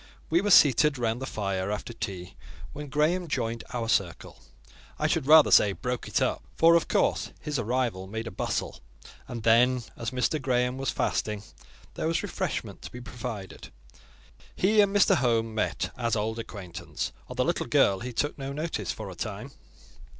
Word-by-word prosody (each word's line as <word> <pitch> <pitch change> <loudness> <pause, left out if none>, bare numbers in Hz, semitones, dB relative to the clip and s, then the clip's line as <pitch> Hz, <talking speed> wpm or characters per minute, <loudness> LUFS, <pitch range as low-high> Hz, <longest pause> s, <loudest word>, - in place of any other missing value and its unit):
We 170 +2 +4
were 205 - -1
seated 150 - +6
round 120 0 -1
the 135 - -4
fire, 100 -2 -2
after 105 +3 -4
tea, 90 -5 -6 0.4
when 150 0 -7
Graham 160 +5 +1
joined 115 -5 -2
our 120 -3 -3
circle: 100 -7 -1 0.6
I - - -1
should 130 - 0
rather 155 0 +8
say, 100 -2 +6
broke 125 +7 -4
it - - +1
up—for, 165 +1 +2
of 170 -1 +3
course, - - +1
his 150 -3 -3
arrival 115 -5 -1
made 110 +3 -5
a 115 - -5
bustle; 90 - -3 0.5
and 115 -2 -6
then, 120 +2 +4
as 115 - -3
Mr. 130 +4 0
Graham 125 0 0
was 135 - -1
fasting, 105 -1 -1 0.5
there - - -2
was 165 0 0
refreshment - - -4
to - - -9
be 125 - -8
provided. 120 -4 -7 0.8
He 210 +3 +4
and 200 -1 +2
Mr. 200 -2 +4
Home 115 -4 +1
met 110 - -1
as 115 -2 0
old 110 +2 -2
acquaintance; 95 -6 -6 0.2
of - - -9
the - - +2
little - - -1
girl 95 -1 +3
he 125 +4 -5
took 145 +5 -2
no 135 0 -4
notice 155 +4 -3
for - - -7
a - - -7
time. - - -6
120 Hz, 175 wpm, -27 LUFS, 110-145 Hz, 0.8 s, rather